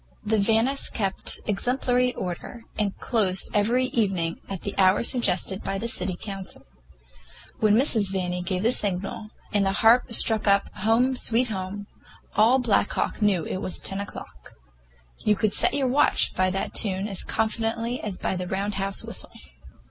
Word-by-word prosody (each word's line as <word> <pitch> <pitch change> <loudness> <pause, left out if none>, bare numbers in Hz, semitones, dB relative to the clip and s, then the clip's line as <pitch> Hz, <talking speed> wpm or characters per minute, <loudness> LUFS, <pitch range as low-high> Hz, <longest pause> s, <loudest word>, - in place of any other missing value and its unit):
The 215 0 +1
Vannis 225 +6 +1
kept 195 -4 -3
exemplary 250 +4 +1
order, 185 +6 -6 0.2
and 205 -2 -1
closed 195 -6 +1
every 235 +5 +2
evening 190 -9 -1
at 195 -3 -6
the 200 - -3
hour 190 +2 +4
suggested 195 -6 +1
by 195 - -3
the 225 +4 -3
City 190 -5 -1
Council. 195 -2 -7 0.9
When 215 -1 +3
Mrs. 220 -6 +3
Vanni 180 -2 -2
gave 185 +1 -2
the 230 - +3
signal, 205 -1 -1 0.2
and 205 -1 +3
the 195 0 0
harp 240 +2 +5
struck 220 -1 +5
up 200 0 +2
"Home, 230 +5 +2
Sweet 245 0 +2
Home," 200 0 -5 0.5
all 225 +5 +5
Black 225 -5 +1
Hawk - - -2
knew 195 -6 +2
it - - -4
was 185 -2 -1
ten 195 - -3
o'clock. 65 - -10 0.6
You 210 - +2
could 205 0 0
set - - +4
your 275 -2 +1
watch 260 +3 +3
by 185 0 +1
that 195 +1 -3
tune 195 -1 0
as 195 -3 -2
confidently 225 +2 -2
as 205 -4 -5
by - - -2
the 180 0 -4
Round 200 +3 -2
House 195 0 -2
whistle. - - -5
205 Hz, 165 wpm, -25 LUFS, 190-230 Hz, 0.9 s, harp